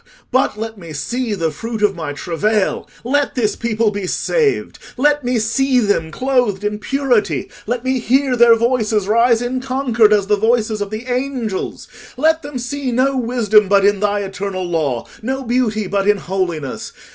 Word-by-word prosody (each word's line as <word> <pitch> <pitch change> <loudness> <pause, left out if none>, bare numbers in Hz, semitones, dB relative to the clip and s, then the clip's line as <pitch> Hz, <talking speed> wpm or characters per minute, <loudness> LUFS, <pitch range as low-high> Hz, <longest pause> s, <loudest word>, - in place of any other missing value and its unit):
But 260 -4 +1
let 220 -1 -5
me 165 -3 -9
see 235 - -2
the 165 -4 -1
fruit 225 +7 -5
of 205 -2 +3
my 155 -4 -4
travail—let 215 - -1
this 220 -5 0
people 225 -2 0
be 200 -2 -4
saved! 450 - 0 0.2
Let 295 +2 +2
me 245 0 0
see 255 +4 +2
them 205 -8 +1
clothed 245 -1 0
in 210 0 -2
purity: 265 -1 0 0.2
let 240 +1 -2
me 260 0 0
hear 260 +2 +2
their 235 -1 +6
voices 225 -4 +1
rise 230 +2 +3
in 255 +1 -2
concord 255 -5 +2
as 205 -2 +3
the 210 +1 +2
voices 220 0 +1
of 205 - -2
the 215 +3 -6
angels: 250 -5 -3 0.3
let 320 +4 +2
them 290 -3 -6
see 255 +2 -3
no 260 +3 +2
wisdom 225 -4 +3
but 200 0 +4
in 205 -1 +3
thy 205 0 0
eternal 195 -1 -4
law, 155 -9 -1 0.2
no 265 +4 -3
beauty 230 -3 0
but 200 +1 -1
in 210 0 +4
holiness. 175 -7 -3
225 Hz, 170 wpm, -18 LUFS, 205-255 Hz, 0.3 s, their